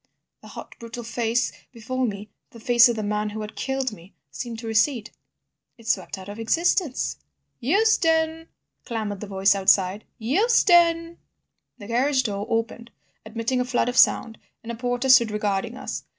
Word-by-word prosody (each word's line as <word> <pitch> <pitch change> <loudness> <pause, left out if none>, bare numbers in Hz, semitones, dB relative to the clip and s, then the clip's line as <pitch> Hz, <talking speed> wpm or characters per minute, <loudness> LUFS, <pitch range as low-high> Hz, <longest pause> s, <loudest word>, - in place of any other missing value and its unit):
The - - -14
hot, - - -10
brutal 235 +1 -8
face 230 +1 -1 0.2
before 255 +2 -3
me, 205 -1 -7 0.2
the 230 - -14
face 240 +1 +5
of 240 - -1
the 215 - -3
man 210 +1 -1
who 215 +1 -6
had 210 0 -8
killed 265 -1 -2
me, 185 -1 -15 0.2
seemed 235 -3 -6
to 230 - -9
recede. 225 +1 +1 0.7
It 230 -1 -15
swept 205 - -1
out 190 0 -10
of 205 +2 -8
existence—" 330 - 0 0.4
"Euston!" 325 - +2 0.4
clamoured 215 -4 -4
the 210 - -7
voices 195 0 +3
outside; 195 0 +2
"Euston!" 340 - +3 0.6
The 205 - -11
carriage 260 +4 +1
door 205 -2 -3
opened 230 +1 -2 0.4
admitting 230 +3 -2
a - - +1
flood 245 0 0
of 245 - -4
sound, 225 -1 +3 0.2
and 230 - -6
a - - -5
porter 245 +2 -2
stood 255 -3 +6
regarding 210 +2 -2
us. - - -6
235 Hz, 165 wpm, -24 LUFS, 215-260 Hz, 0.7 s, stood